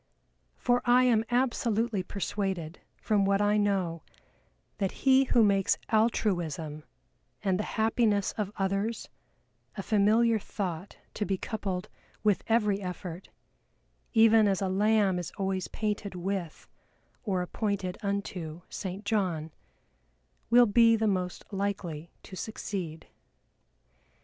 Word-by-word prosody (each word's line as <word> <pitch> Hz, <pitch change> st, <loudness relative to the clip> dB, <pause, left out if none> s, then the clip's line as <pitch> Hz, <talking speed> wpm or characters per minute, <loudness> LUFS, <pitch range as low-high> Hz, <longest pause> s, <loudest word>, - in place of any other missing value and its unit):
For 245 Hz, 0 st, +2 dB
I 250 Hz, +1 st, +5 dB
am 230 Hz, -3 st, +3 dB
absolutely 235 Hz, -4 st, +1 dB
persuaded 190 Hz, -3 st, -3 dB, 0.2 s
from 210 Hz, -2 st, +1 dB
what 195 Hz, 0 st, +2 dB
I 205 Hz, 0 st, +3 dB
know, 190 Hz, -5 st, 0 dB, 0.8 s
that 195 Hz, -2 st, 0 dB
he 265 Hz, 0 st, +6 dB
who 240 Hz, -2 st, +4 dB
makes 195 Hz, -2 st, +3 dB
Altruism 175 Hz, -9 st, 0 dB, 0.6 s
and 190 Hz, -2 st, +1 dB
the -, -, 0 dB
happiness 220 Hz, -2 st, +2 dB
of 205 Hz, -2 st, -3 dB
others 195 Hz, +4 st, -1 dB, 0.7 s
a 195 Hz, -, -3 dB
familiar 220 Hz, +3 st, +3 dB
thought 185 Hz, -3 st, -5 dB, 0.2 s
to -, -, -2 dB
be 195 Hz, -2 st, -1 dB
coupled 190 Hz, -4 st, -4 dB, 0.4 s
with 210 Hz, -3 st, +2 dB
every 210 Hz, -3 st, +2 dB
effort 180 Hz, -1 st, -6 dB, 0.8 s
(even 225 Hz, -1 st, +6 dB
as 195 Hz, -2 st, +1 dB
a 195 Hz, -, -1 dB
lamb 200 Hz, -1 st, +2 dB
is 175 Hz, -, -5 dB
always 190 Hz, -2 st, -1 dB
painted 210 Hz, -2 st, -3 dB
with, 180 Hz, -2 st, -4 dB, 0.5 s
or 190 Hz, -6 st, -1 dB
appointed 195 Hz, -1 st, -3 dB
unto, 185 Hz, -5 st, -4 dB
St. 195 Hz, +1 st, -6 dB
John), 180 Hz, -7 st, -1 dB, 1.0 s
will 240 Hz, +1 st, +7 dB
be 230 Hz, +1 st, +5 dB
the 220 Hz, 0 st, 0 dB
most 185 Hz, -3 st, -1 dB
likely 190 Hz, -5 st, -3 dB
to 190 Hz, -, -10 dB
succeed. 180 Hz, -4 st, -5 dB
200 Hz, 120 wpm, -29 LUFS, 185-220 Hz, 1.0 s, will